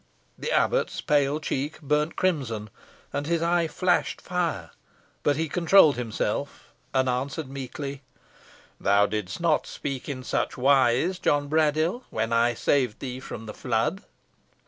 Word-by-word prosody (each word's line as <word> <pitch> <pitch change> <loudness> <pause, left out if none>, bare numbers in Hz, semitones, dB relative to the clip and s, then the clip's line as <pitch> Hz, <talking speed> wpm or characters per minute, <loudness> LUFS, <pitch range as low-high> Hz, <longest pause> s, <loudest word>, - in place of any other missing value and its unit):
The - - -4
abbot's - - +1
pale 145 0 +2
check 145 0 -3
burnt 150 +2 0
crimson, 125 - -1 0.4
and 145 +1 -2
his 165 0 +1
eye 170 0 +2
flashed 180 +3 0
fire, 170 - -2 0.5
but 145 - +2
he 160 +2 -1
controlled 170 -1 +5
himself, 120 +3 -3 0.2
and 130 -1 +2
answered 135 +4 -2
meekly, 140 +1 -6 0.8
"Thou 100 +1 +4
didst 105 -3 -3
not 165 -3 +2
speak 135 0 -5
in 130 -2 -4
such - - -1
wise, 135 +6 +3
John 145 -4 +1
Braddyll, 155 - +2
when 110 +1 -1
I 120 +1 +3
saved 125 -3 +1
thee 130 -1 -5
from 115 -4 -8
the 105 - -7
flood." 125 - -1
140 Hz, 140 wpm, -26 LUFS, 125-160 Hz, 0.8 s, controlled